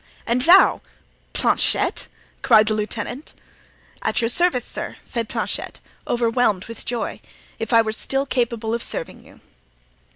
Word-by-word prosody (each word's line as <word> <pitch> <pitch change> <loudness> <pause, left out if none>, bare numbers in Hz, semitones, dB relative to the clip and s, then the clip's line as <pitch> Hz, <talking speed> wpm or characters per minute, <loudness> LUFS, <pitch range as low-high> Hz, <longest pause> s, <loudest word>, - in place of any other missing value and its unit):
"And 240 +2 +1
thou—Planchet!" 350 +8 +2 0.3
cried 215 -3 +5
the 215 - +2
lieutenant. 215 +6 -4 0.7
"At - - 0
your 230 - +1
service, 315 -3 +2
sir," - - -5
said 230 -3 -4
Planchet, - - -4 0.3
overwhelmed 230 -5 +1
with 230 - -7
joy; 240 -1 -3 0.4
"if 225 - -4
I 230 -1 +6
were 220 - -2
still 270 +5 -1
capable 235 -4 -1
of 235 - -1
serving 165 - -5
you." - - -19
235 Hz, 130 wpm, -22 LUFS, 220-250 Hz, 0.7 s, I